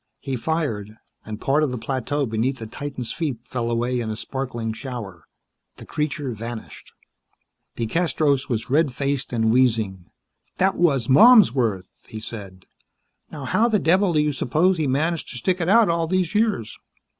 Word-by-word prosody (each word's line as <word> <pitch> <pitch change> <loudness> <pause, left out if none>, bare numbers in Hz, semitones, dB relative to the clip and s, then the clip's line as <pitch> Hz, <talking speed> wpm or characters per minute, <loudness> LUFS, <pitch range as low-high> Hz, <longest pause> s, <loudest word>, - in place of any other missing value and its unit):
He 135 -2 -4
fired, 115 -7 -3 0.3
and 110 -1 -6
part 140 +5 +1
of 155 - +1
the 125 - -4
plateau 135 +4 -2
beneath 115 +4 -1
the 115 - -7
titan's 130 0 -5
feet 150 -8 -2
fell 120 -2 -3
away 120 +2 0
in 115 -2 -3
a 110 - -3
sparkling 120 -2 -4
shower. 110 - -8 0.5
The - - -12
creature 150 -3 -3
vanished. 115 0 -8 0.9
DeCastros 145 +2 0
was 115 -2 -2
red 150 0 +3
faced 140 0 -2
and 110 -2 +1
wheezing. 110 -7 +1 0.5
"That 190 +1 +3
was 140 -9 +2
Malmsworth," 130 - +5 0.2
he 110 - -7
said. 100 -5 -9 0.7
"Now 145 -3 -7
how 215 - +2
the 220 -3 +2
devil 185 +1 +2
do 155 - +3
you 150 0 +1
suppose 160 +8 +1
he 155 -3 0
managed 155 +5 -1
to 125 - -6
stick 180 +9 0
it 170 - 0
out 225 +1 +6
all 165 -1 0
these 185 -1 0
years!" 210 - 0
130 Hz, 165 wpm, -23 LUFS, 115-160 Hz, 0.9 s, out